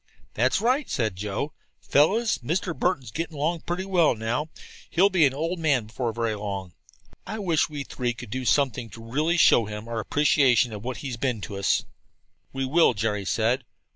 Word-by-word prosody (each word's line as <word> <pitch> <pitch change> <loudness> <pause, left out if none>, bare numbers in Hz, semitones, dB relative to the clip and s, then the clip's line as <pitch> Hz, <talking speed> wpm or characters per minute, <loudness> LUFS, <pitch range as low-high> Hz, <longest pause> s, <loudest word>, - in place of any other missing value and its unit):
"That's 130 - +2
right," 255 +6 +1
said 110 -6 -1
Joe. 105 +9 -3 0.3
"Fellows, 215 +11 +2
Mr. 170 +6 -2
Burton's 135 -11 -1
getting 160 +2 -2
pretty 180 +2 -2
well 180 -5 +3
along - - +1
now. 120 +8 -2 0.4
He'll 195 +4 +3
be 170 -6 +5
an 130 - -3
old 165 +4 -2
man 140 -8 +2
before 115 +2 -3
very 115 0 -1
long. 100 -3 -5 0.5
I 215 - -4
wish 175 -7 +1
we 145 -2 -5
three 125 -2 -3
could 105 - -10
do 130 +2 -3
something 125 -3 +1
to 115 +2 -11
really 150 +9 0
show 120 -8 +5
him 105 +1 -7
our 115 -1 -3
appreciation 130 -2 +3
of 105 0 -7
what 125 -1 -4
he's 125 -4 -4
been 125 -2 -1
to 100 - -6
us." 100 0 +1 0.7
"We 135 0 -2
will," 145 -2 +4
Jerry 105 -1 -1
said. 115 +6 +1
130 Hz, 185 wpm, -25 LUFS, 115-165 Hz, 0.7 s, be